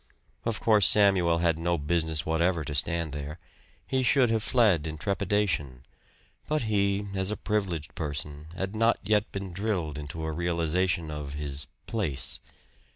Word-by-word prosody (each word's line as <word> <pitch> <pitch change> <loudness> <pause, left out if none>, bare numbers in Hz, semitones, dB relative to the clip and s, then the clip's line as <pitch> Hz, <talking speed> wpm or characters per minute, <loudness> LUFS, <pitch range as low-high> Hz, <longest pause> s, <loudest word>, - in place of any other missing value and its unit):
Of 115 -2 0
course 105 -4 +5
Samuel 95 -5 +4
had 85 -1 +1
no 85 +1 +1
business 80 0 0
whatever 85 +1 +1
to 75 - -5
stand 80 +2 -1
there. 75 +2 -5 0.5
He 130 - 0
should 130 -1 +4
have 110 -1 +1
fled 105 - +3
in 80 0 -5
trepidation. 95 - -1 0.6
But 150 -3 0
he, 100 -2 +1
as 95 0 0
a 105 - -2
privileged 95 -8 -2
person, 75 -2 -4
had 95 +3 -3
not 115 +2 +3
yet 105 +1 +1
been 95 -2 -5
drilled 90 -7 -2
into 75 +2 -6
a 80 - -2
realization 85 0 0
of 75 -2 -5
his 70 -1 -4 0.2
"place." 95 - +1
85 Hz, 155 wpm, -28 LUFS, 75-105 Hz, 0.6 s, course